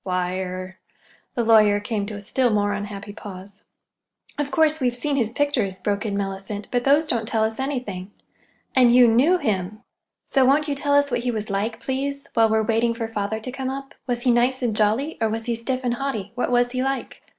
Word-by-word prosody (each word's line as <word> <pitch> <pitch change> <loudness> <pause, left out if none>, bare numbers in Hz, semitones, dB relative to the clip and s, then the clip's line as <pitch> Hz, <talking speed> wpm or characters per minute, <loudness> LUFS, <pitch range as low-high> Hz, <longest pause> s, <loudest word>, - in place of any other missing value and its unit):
"Why—er—" 185 0 -3 0.6
The 240 - +1
lawyer 215 -2 +5
came 205 -1 -3
to 210 - -5
a 205 - -7
still 245 +4 +1
more 205 -2 +1
unhappy 205 0 -6
pause. 195 0 -10 0.7
"Of 290 -1 -2
course, 310 +1 +3
we've 245 -1 +1
seen 285 +3 -1
his 235 -5 +1
pictures," 240 -8 0
broke 205 +3 -2
in 200 -1 -2
Mellicent, 195 +1 -4
"but 245 -1 0
those 290 +4 +4
don't 230 -7 -1
tell 225 -2 +1
us 220 +2 -2
anything. 245 -9 -3 0.7
And 245 -2 +6
you 250 -1 +8
knew 265 +11 +4
him. 210 - -2 0.4
So 270 - +2
won't 285 +4 +3
you 290 - 0
tell 285 +1 0
us 285 -1 +3
what 245 - +1
he 245 +1 -2
was 215 -3 -3
like, 215 +3 -2
please, 280 +1 -3
while 225 -1 +4
we're 220 0 +2
waiting 230 +1 +1
for 230 -1 -3
father 220 0 -3
to 255 - -6
come 265 0 -4
up? 270 +1 -6
Was 240 -1 -2
he 250 - +4
nice 250 +2 +2
and 230 -3 0
jolly, 220 +9 +1
or 225 - +2
was 225 +1 -3
he 240 - 0
stiff 255 +3 -2
and 245 -1 0
haughty? 240 -6 -3
What 245 - -1
was 245 0 +2
he 255 0 -1
like?" 270 +1 -3
230 Hz, 215 wpm, -23 LUFS, 205-260 Hz, 0.7 s, you